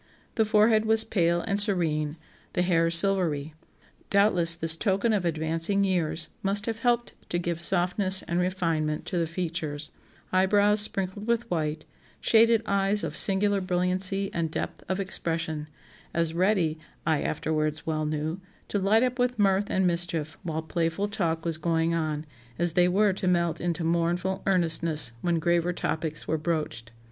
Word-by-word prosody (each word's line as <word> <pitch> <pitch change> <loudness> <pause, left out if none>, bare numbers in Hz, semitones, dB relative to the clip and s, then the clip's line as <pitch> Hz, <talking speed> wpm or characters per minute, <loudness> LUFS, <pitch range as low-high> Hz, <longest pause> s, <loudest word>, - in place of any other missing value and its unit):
The 220 - +1
forehead 215 +1 +3
was 220 0 +4
pale 175 -5 +1
and 200 +3 0
serene, 160 -7 0 0.4
the 180 - +1
hair 165 -2 +2
silvery; 165 -4 +1 0.6
doubtless 180 -5 +4
this 165 -1 +4
token 200 +4 0
of 195 -4 0
advancing 165 +4 0
years 175 -4 0
must 200 +1 +2
have 225 -1 -4
helped 240 0 0 0.2
to 175 - -1
give 170 -1 -3
softness 185 +2 +2
and 170 +1 -2
refinement 165 -4 -1
to 180 - -2
the 165 - -1
features; 160 -3 -4 0.4
eyebrows, 205 +3 +3
sprinkled 200 0 -1
with 235 0 -1
white, 155 -2 -2 0.3
shaded 225 0 +4
eyes 200 0 0
of - - -4
singular 200 0 +4
brilliancy 185 +2 0
and 165 -1 -2
depth - - -5
of 190 +1 -1
expression, 165 -5 -2 0.5
as 165 -1 0
ready 175 -3 +1 0.3
(I 155 -2 +1
afterwards 155 0 -2
well 155 -1 -2
knew) 155 +4 -3 0.3
to 205 - -1
light 210 +5 +3
up 250 0 -2
with 250 -1 0
mirth 200 -1 +1
and 190 0 +1
mischief 170 -3 -1
while 160 -2 -4
playful 165 +4 -2
talk 165 -6 -2
was 165 -2 -1
going 165 0 0
on, 155 -2 -2 0.3
as 175 -1 +2
they 180 0 +4
were 200 +2 +2
to 185 0 -3
melt 170 -2 0
into 170 -1 -2
mournful 170 +3 -1
earnestness 165 -7 +4
when 175 -1 0
graver 170 +1 0
topics 160 -2 -4
were 160 - -1
broached. 150 -9 -3
175 Hz, 155 wpm, -26 LUFS, 160-195 Hz, 0.6 s, was